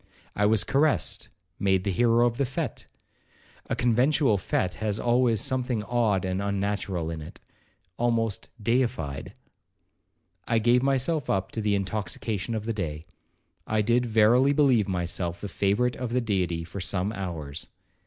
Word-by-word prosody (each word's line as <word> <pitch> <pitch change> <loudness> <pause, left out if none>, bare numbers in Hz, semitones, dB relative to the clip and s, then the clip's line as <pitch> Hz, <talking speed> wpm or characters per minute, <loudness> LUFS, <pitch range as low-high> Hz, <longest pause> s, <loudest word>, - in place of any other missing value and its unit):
I 105 0 +3
was 110 -1 +3
caressed,—made 95 - 0
the 100 - 0
hero 120 +4 +3
of 120 -1 0
the 140 - +1
fete,—(a 140 -2 -8
conventual 125 -1 +3
fete 90 0 -1
has 105 -1 -1
always 120 -2 +2
something 130 -5 -1
odd 105 -4 +1
and 95 +1 -1
unnatural 100 -4 -2
in 80 -1 -5
it),—almost 115 +8 -4
deified. 115 - -1 1.1
I 115 - +2
gave 120 +3 +4
myself 135 +2 0
up 95 0 0
to 110 - -3
the 105 -1 +1
intoxication 100 +2 -3
of 110 - -3
the 115 - -1
day,—I 90 +4 -5
did 120 +3 +2
verily 115 +5 +4
believe 130 -8 +3
myself 90 -1 -2
the 105 - -5
favourite 105 +6 +1
of 125 -2 -4
the 125 - +2
Deity 90 -7 -1
for 85 +4 -7
some 95 +3 0
hours. 80 -7 -5
105 Hz, 135 wpm, -26 LUFS, 95-120 Hz, 1.1 s, gave